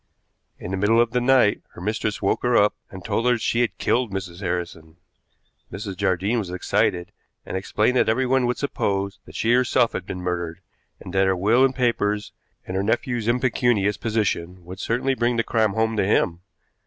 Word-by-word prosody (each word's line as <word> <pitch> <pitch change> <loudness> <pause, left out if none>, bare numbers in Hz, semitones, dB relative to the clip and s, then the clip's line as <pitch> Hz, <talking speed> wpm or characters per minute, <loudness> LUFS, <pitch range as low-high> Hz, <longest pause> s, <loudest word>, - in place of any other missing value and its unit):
In 90 - -7
the 95 - -1
middle 105 +4 +3
of 120 -1 +3
the 125 +1 0
night 125 -4 +3
her - - -11
mistress 105 +2 -2
woke 100 - +1
her 125 -1 +2
up, 105 0 +4 0.2
and 95 -2 -10
told 115 - 0
her 125 - +5
that 115 - -3
she 120 - 0
had 120 - -1
killed 120 -3 0
Mrs. 95 -3 -5
Harrison. 85 -3 -4 0.7
Mrs. 100 -1 -6
Jardine 95 +6 0
was 100 -5 -4
excited, 90 -1 0 0.3
and - - -6
explained 105 +5 0
that - - +3
everyone 130 +2 +2
would 125 - -1
suppose 100 -8 -2
that - - -14
she 115 +1 +2
herself 125 -1 +3
had 95 - -5
been 90 - -5
murdered, 85 -1 -3 0.4
and - - -10
that 95 0 +3
her 95 - +2
will 110 +8 +3
and 135 -1 +2
papers, 105 -4 0 0.3
and 95 - -5
her 95 - +1
nephew's 120 +2 -1
impecunious 120 -4 +1
position, 95 -6 -2
would 90 +2 -9
certainly 125 +4 0
bring 120 -1 0
the 115 - +2
crime 110 -2 +1
home 110 +1 0
to - - +2
him. 90 -3 +1
105 Hz, 195 wpm, -23 LUFS, 95-120 Hz, 0.7 s, her